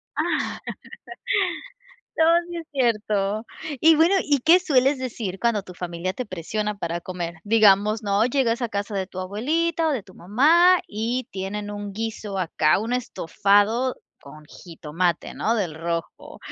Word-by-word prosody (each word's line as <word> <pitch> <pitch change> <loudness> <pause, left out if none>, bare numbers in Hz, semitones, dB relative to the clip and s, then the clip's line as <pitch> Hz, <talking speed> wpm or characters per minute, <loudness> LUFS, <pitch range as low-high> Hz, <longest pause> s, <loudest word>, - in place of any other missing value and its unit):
Ah, - - +1 2.0
no, 320 - +4 0.2
sí 345 - -6
es 330 -2 -6
cierto, 215 -5 0 0.4
y 320 -1 +6
bueno, 335 +5 +4
¿y 290 -2 +2
qué 345 +3 +7
sueles 275 -4 +2
decir 220 -7 -5
cuando 225 -4 +1
tu 180 - -11
familia 175 +1 -4
te 255 - -5
presiona 210 +3 -4
para 170 -1 -3
comer?, 175 -2 -5
digamos, 210 0 +4
¿no?, 200 +2 +2
llegas 250 -2 0
a 235 - 0
casa 205 0 -4
de 190 -1 -2
tu 185 - -9
abuelita 315 - 0
o - - +1
de 235 -8 -3
tu 185 - -17
mamá, 325 - +4
y 230 +4 -3
tienen 205 +2 -4
un 205 -1 -6
guiso 215 -2 -4
acá, 160 -2 +2
un 225 +4 -3
estofado 225 +1 +1 0.2
con 150 +2 -13
jitomate, 170 +1 -3
¿no?, 230 +2 0
del 175 -7 -2
rojo, 165 +1 -5
210 Hz, 155 wpm, -23 LUFS, 185-250 Hz, 2.0 s, qué